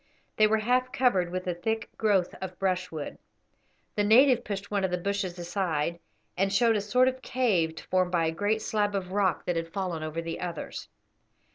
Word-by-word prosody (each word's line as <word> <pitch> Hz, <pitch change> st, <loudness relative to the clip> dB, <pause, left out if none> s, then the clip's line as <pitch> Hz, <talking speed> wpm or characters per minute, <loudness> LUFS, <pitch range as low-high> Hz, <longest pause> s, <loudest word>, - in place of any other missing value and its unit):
They 215 Hz, -, +5 dB
were 220 Hz, +1 st, +3 dB
half 250 Hz, +3 st, +1 dB
covered 245 Hz, -10 st, +2 dB
with 185 Hz, 0 st, -3 dB
the 180 Hz, -, 0 dB
thick 220 Hz, +6 st, -2 dB
growth 200 Hz, -5 st, +2 dB
of 185 Hz, -1 st, -6 dB
brushwood. 180 Hz, -5 st, -2 dB, 0.8 s
The 205 Hz, -, +2 dB
native 245 Hz, +4 st, +6 dB
pushed 200 Hz, 0 st, -5 dB
one 200 Hz, -2 st, 0 dB
of 190 Hz, -, +1 dB
the 180 Hz, -, -1 dB
bushes 195 Hz, -1 st, -2 dB
aside, 170 Hz, -2 st, -1 dB, 0.4 s
and 195 Hz, +2 st, +1 dB
showed 225 Hz, +3 st, +4 dB
a 205 Hz, -, +1 dB
sort 250 Hz, +5 st, +3 dB
of 260 Hz, 0 st, -1 dB
cave 210 Hz, -12 st, 0 dB
formed 185 Hz, -1 st, +2 dB
by 170 Hz, -2 st, +2 dB
a 160 Hz, -, +1 dB
great 205 Hz, +6 st, 0 dB
slab 205 Hz, -1 st, 0 dB
of 185 Hz, -2 st, -3 dB
rock 190 Hz, -3 st, +1 dB
that 175 Hz, -1 st, 0 dB
had 165 Hz, 0 st, -3 dB
fallen 185 Hz, -4 st, -3 dB
over 155 Hz, +1 st, -4 dB
the 165 Hz, 0 st, -4 dB
others. 175 Hz, -3 st, -5 dB
195 Hz, 190 wpm, -28 LUFS, 175-215 Hz, 0.8 s, native